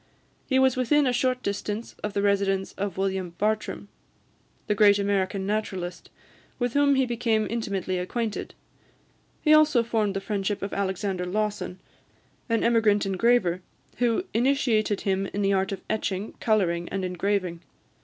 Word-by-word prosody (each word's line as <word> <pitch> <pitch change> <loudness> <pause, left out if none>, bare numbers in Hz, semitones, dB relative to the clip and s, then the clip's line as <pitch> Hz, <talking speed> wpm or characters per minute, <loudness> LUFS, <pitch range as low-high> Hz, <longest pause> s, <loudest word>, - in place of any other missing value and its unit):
He 260 - +2
was 265 -1 +4
within 280 +3 +3
a 250 - +2
short 255 +1 0
distance 205 +2 -3
of 210 -1 -3
the 200 - 0
residence 195 -1 +1
of 195 -2 -4
William 190 -2 -2
Bartram, 215 -1 -1 0.8
the - - +1
great 205 -1 +5
American 195 -1 0
naturalist, 190 -4 -3 0.5
with 245 -2 -1
whom 285 -1 +4
he 265 -1 +3
became 230 -3 0
intimately 195 -5 -2
acquainted; 215 +4 -3 0.9
he 305 - +5
also 305 -6 +5
formed 220 -4 0
the - - 0
friendship 200 0 -2
of 200 - -4
Alexander 190 -1 -2
Lawson, 205 -1 -2 0.7
an 230 -1 +1
emigrant 220 -3 +3
engraver, 195 -2 +2 0.4
who 240 +8 +1
initiated 235 -5 +2
him 195 0 0
in 205 - 0
the 195 0 +2
art 190 0 +1
of 195 -1 -5
etching, 210 -2 -2
colouring, 175 -6 +1
and 190 -1 -2
engraving. 180 -1 -1
205 Hz, 145 wpm, -26 LUFS, 190-230 Hz, 0.9 s, great